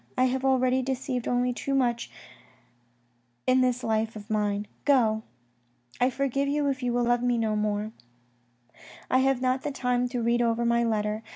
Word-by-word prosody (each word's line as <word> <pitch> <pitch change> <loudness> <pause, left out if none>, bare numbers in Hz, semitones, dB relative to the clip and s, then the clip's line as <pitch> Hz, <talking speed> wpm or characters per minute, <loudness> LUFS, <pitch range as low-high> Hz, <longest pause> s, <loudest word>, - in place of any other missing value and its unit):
I 255 - +4
have 260 +1 -1
already 260 -1 +2
deceived 255 -1 -3
only 245 0 +1
too 275 +2 -2
much 240 -3 0 1.4
in 255 0 +4
this 250 -1 +1
life 220 0 0
of 210 +1 -9
mine. 205 -1 0 0.2
Go! 230 -6 +3 0.8
I 250 - +3
forgive 275 +1 -1
you 290 0 0
if 270 0 -2
you 245 -1 0
love 240 0 +2
me 245 -1 +1
no 220 -2 0
more. 210 0 -1 1.2
I 255 - +4
have 265 -1 +2
not 255 +1 +1
the - - -3
time 250 -2 0
to 245 -2 -2
read 235 +1 +2
over 235 0 +1
my 235 0 +2
letter. 215 -1 -1
245 Hz, 170 wpm, -27 LUFS, 225-260 Hz, 1.4 s, I